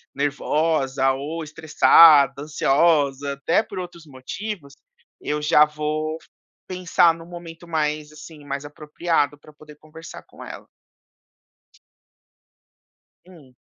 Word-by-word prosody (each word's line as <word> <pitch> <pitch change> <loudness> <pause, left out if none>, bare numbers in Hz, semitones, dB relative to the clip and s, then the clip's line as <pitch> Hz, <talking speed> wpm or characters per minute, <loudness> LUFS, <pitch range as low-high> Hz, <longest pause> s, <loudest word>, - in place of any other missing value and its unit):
nervosa 140 -1 0
ou 150 +5 -5
estressada, 155 -2 +5
ansiosa, 145 -2 +1
até 140 +9 +1
por 195 - -11
outros 175 -2 -8
motivos, 145 +3 -8 0.5
eu 150 0 -3
já 150 0 +5
vou 155 +1 -4 0.5
pensar 180 -2 +2
num 165 0 -12
momento 170 -1 -11
mais, 150 -2 -2
assim, 150 -1 -13
mais 140 0 -5
apropriado 150 0 -2
pra 155 - -18
poder 150 0 -16
conversar 155 +2 -13
com - - -14
ela. - - -10 2.6
Hum. 150 -9 -18
150 Hz, 105 wpm, -22 LUFS, 145-165 Hz, 2.6 s, estressada